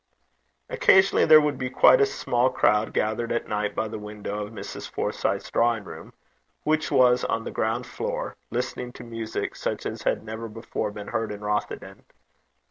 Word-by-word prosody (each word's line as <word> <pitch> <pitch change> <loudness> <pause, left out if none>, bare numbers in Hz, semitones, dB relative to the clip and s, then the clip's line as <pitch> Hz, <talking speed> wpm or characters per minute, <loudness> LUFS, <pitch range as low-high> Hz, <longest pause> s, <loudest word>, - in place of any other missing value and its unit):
Occasionally 475 - +4
there 155 - +9
would 150 -1 -1
be 130 -1 -2
quite 430 - +6
a 420 - +5
small 125 - +1
crowd 105 -3 +2
gathered 110 +2 -1
at 120 - -1
night 105 -1 -2
by 110 - -1
the 110 0 -6
window 105 0 -5
of 105 - -8
Mrs. 100 -3 -7
Forsyth's - - -2
drawing 115 -2 +2
room, - - -10 0.5
which 155 +1 +1
was 125 -1 +4
on 115 - -1
the - - -5
ground 115 +3 -1
floor, - - -4
listening 125 +1 -3
to - - -10
music 115 -1 -4
such - - -3
as - - -4
had - - 0
never 110 +1 -6
before 110 -1 -4
been 105 0 -8
heard 110 -1 -2
in 105 0 -7
Rothieden. 105 0 -3
115 Hz, 175 wpm, -25 LUFS, 105-125 Hz, 0.5 s, there